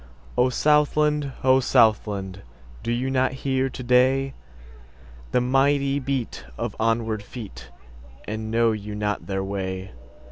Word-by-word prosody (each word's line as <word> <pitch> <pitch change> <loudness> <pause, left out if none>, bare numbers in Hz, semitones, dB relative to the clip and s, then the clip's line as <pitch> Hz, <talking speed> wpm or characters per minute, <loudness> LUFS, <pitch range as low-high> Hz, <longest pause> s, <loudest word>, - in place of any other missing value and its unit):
O 125 +1 +3
Southland! 150 +1 +2
O 130 0 +5
Southland! 105 -6 +2 0.4
Do 115 - -2
you 125 +3 -1
not 130 0 +1
hear 135 -1 +1
to 130 - -8
dayThe 130 +2 +3 1.1
mighty 140 +2 +2
beat 135 -3 -3
of - - -3
onward 115 -1 0
feet, 100 - -10 0.6
And 110 +1 -4
know 115 0 +3
you 105 -1 -5
not 105 0 -2
their 95 -1 -2
way? 95 -1 -4
120 Hz, 120 wpm, -24 LUFS, 105-135 Hz, 1.1 s, O